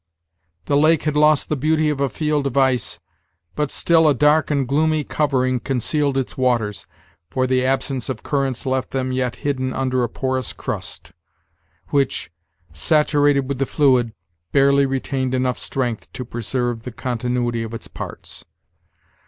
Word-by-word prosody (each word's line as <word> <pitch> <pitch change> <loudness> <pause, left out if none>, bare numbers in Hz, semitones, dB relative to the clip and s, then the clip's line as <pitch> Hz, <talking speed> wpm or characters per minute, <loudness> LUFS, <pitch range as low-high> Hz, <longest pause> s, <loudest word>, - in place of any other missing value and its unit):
The 140 - +1
lake 155 +2 +4
had 150 -1 -1
lost 150 0 +4
the 150 - 0
beauty 155 +2 +1
of 145 - -3
a 140 - +2
field 150 0 0
of 135 0 -4
ice, 130 -2 +1 0.5
but 150 -1 -1
still 165 +1 +3
a 145 - +4
dark 150 +3 +3
and 140 -4 0
gloomy 155 +3 +2
covering 130 -4 0
concealed 135 +3 0
its 135 - -2
waters, 120 -5 0 0.4
for 130 +8 0
the 130 0 +1
absence 135 -1 -1
of 125 -4 -4
currents 135 -4 -1
left 130 0 -1
them 130 -1 -2
yet 130 -1 -1
hidden 130 -2 0
under 130 -1 0
a 120 - -1
porous 130 -1 -2
crust, 85 - -6 0.8
which, 135 - 0 0.4
saturated 145 - +3
with 140 -2 -3
the 135 - 0
fluid, 130 -6 +2 0.4
barely 140 0 +4
retained 130 -1 -1
enough 125 -1 0
strength 125 -5 -3
to 125 - -5
preserve 120 +1 -2
the 125 - -7
continuity 120 0 -2
of 115 -1 -5
its 115 - -7
parts. - - -8
130 Hz, 155 wpm, -21 LUFS, 125-145 Hz, 0.8 s, lake